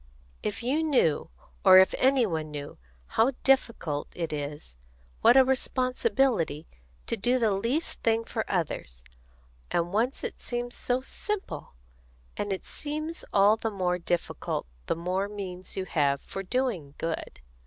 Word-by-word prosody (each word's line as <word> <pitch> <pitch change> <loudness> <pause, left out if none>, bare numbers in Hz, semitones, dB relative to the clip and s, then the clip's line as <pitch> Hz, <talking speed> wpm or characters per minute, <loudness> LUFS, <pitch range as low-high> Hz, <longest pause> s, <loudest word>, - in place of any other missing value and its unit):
"If 210 +3 -3
you 275 +6 +1
knew, 260 - +2 0.3
or 185 - +9
if 190 0 +7
any 265 -2 +4
one 160 -5 -2
knew, 145 - -7 0.3
how 235 - +2
difficult 230 - +2
it 165 -3 -3
is, 145 - -5 0.5
what 250 - +7
a 265 - +8
responsibility, 255 - +1 0.4
to - - 0
do 240 +4 +2
the 225 -4 +2
least 235 +12 -1
thing 225 0 +2
for 225 -1 -3
others! 140 - -2 0.7
And 175 +1 0
once 235 +6 0
it - - -4
seemed 240 0 -3
so 250 +1 -1
simple! 270 - -5 0.6
And 205 - -2
it 190 - -3
seems 310 +2 -5
all 205 +2 +5
the 225 - -2
more 180 -3 0
difficult, 175 0 -2 0.2
the - - +1
more 185 +4 -1
means 185 -3 -6
you 190 - -1
have 140 -5 +1
for 195 - -6
doing 195 - -2
good. 165 0 -4
205 Hz, 145 wpm, -28 LUFS, 170-255 Hz, 0.7 s, or